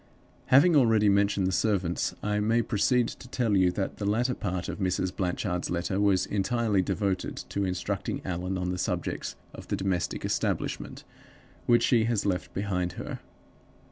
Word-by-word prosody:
"Having 150 +6 +6
already 110 -6 +5
mentioned 100 -1 +2
the 95 - +1
servants, 95 -4 0
I 105 0 0
may 115 +3 +2
proceed 120 +3 +2
to - - -10
tell 120 -4 0
you 95 -2 +4
that 95 0 -3
the 100 - -4
latter 120 +4 +1
part 95 -6 -3
of - - -5
Mrs. 95 -1 -1
Blanchard's 90 -1 -2
letter 90 +3 -1
was 100 -3 +3
entirely 105 0 +1
devoted 95 0 -1
to 100 0 -1
instructing 90 -1 -2
Allan 90 +1 -2
on 90 0 -2
the 90 - -3
subject - - -2 0.2
of - - -10
the - - -1
domestic 95 -3 -2
establishment - - -2 0.6
which 120 0 +5
she 115 -3 +3
has 115 -3 0
left 90 -3 -1
behind 90 -3 -1
her. - - -6
100 Hz, 165 wpm, -28 LUFS, 90-110 Hz, 0.6 s, Having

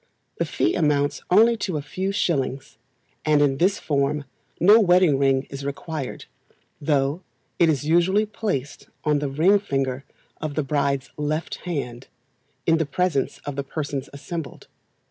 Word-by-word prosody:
The - - +1
fee - - 0
amounts 145 -4 +1
only 225 +5 +6
to 185 -6 -2
a - - -3
few 185 +7 -3
shillings, 135 - -1 0.4
and 155 -1 +3
in 140 -2 +3
this 190 +6 +2
form 140 0 0 0.3
no 205 +6 +7
wedding 180 -7 +4
ring 135 -1 +3
is 140 0 -6
required, 140 0 -5 0.6
though 145 +2 +1 0.4
it 170 - +5
is 145 -3 +1
usually 175 +6 +3
placed 200 - -4 0.2
on 150 -2 +2
the 145 -1 -2
ring 175 +9 +4
finger 135 -8 -2 0.4
of 155 -2 -3
the 155 - 0
bride's 140 -1 -1
left 155 +2 -2
hand, 125 -7 -4 0.6
in 165 0 +3
the 160 - +1
presence 150 -2 0
of 145 - -4
the 140 - -2
persons 140 -1 -4
assembled. 150 0 -7
150 Hz, 150 wpm, -24 LUFS, 140-175 Hz, 0.6 s, no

